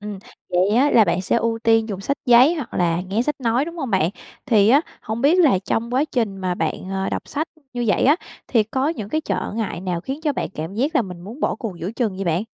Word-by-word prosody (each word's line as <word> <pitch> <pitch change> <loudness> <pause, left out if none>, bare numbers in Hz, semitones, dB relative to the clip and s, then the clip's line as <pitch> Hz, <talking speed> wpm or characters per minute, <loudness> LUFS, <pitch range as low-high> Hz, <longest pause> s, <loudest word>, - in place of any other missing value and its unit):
Ừm, 205 -1 -6 0.3
vậy 180 +2 +2
á 280 +4 +4
là 225 - +6
bạn 185 - 0
sẽ 190 - +1
ưu 230 0 0
tiên 225 -1 +3
dùng 195 -3 -4
sách 280 +8 -1
giấy 250 +6 +6
hoặc 290 -8 -6
là 170 -1 +1
nghe 195 +5 -1
sách 295 +1 -3
nói, 240 +2 +1
đúng 335 +2 -8
hông 270 -7 -4
bạn? 185 -4 +2 0.4
Thì 215 -6 +4
á, 275 +5 +6 0.2
hông 220 +2 -4
biết 300 +8 +4
là 295 - +5
trong 225 +5 -2
quá 270 +3 +3
trình 230 -9 -2
mà 185 -2 -2
bạn, 185 - -3
à, 190 0 -1
đọc - - -2
sách 310 +3 -2 0.2
như 245 -1 -2
vậy 205 - +2
á, 290 +4 +5 0.3
thì 230 -4 +3
có 260 +6 -1
những 225 -11 -4
cái 310 +8 0
trở - - -3
ngại 215 -6 -3
nào 180 -2 -2
khiến 270 - -5
cho 300 -2 +1
bạn - - -3
cảm 165 +1 -6
giác 275 +9 0
là - - +4
mình 180 -4 -8
muốn 215 - -10
bỏ - - +1
cuộc 210 -8 -6
giữa 175 +4 -4
chừng 225 -5 -1
vậy 195 - -3
bạn? 170 +3 0
225 Hz, 265 wpm, -21 LUFS, 190-270 Hz, 0.4 s, là